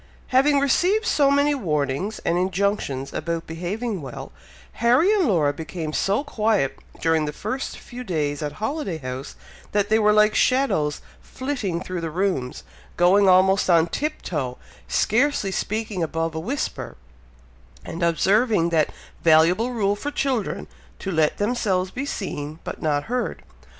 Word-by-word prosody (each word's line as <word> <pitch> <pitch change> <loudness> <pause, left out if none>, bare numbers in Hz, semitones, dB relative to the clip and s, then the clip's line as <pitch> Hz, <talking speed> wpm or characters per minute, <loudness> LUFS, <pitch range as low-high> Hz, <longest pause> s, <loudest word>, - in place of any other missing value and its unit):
Having 280 +2 +4
received 365 +10 +2
so 285 -10 +3
many 285 +1 +3
warnings 160 - -1
and 170 - +2
injunctions 180 -7 -1
about 165 -1 -3
behaving 190 +5 -4
well, 135 -4 -8 0.5
Harry 255 - +4
and 390 -7 +2
Laura 155 -9 +2
became 160 0 -5
so 200 - +1
quiet 215 - 0 0.2
during 160 -1 +2
the 150 - -3
first 215 - -4
few 250 0 -9
days 150 - -2
at 150 -1 -3
Holiday 220 - -3
House, 130 -1 -6 0.4
that 205 0 +1
they 220 +1 +4
were 210 -1 +4
like 210 0 +4
shadows 250 - +2 0.2
flitting 250 -11 -3
through 185 -2 -4
the 165 - -3
rooms, 165 -7 -2 0.3
going 190 +3 +5
almost 190 +1 +4
on 165 -2 +5
tiptoe, 165 - -3 0.3
scarcely 235 -3 +1
speaking 210 0 -2
above 165 0 -1
a 160 - -3
whisper, 250 - -4 0.9
and 170 - -6
observing 190 +3 +3
that 160 -3 +2 0.3
valuable 170 +8 +4
rule 205 -5 0
for 285 +8 -4
children, 265 -7 -1 0.3
to 195 - -4
let 160 -3 +2
themselves 205 -4 0
be 275 +3 -4
seen, 155 - -4
but - - -6
not 145 -2 +1
heard. 245 0 -3
195 Hz, 145 wpm, -23 LUFS, 160-240 Hz, 0.9 s, going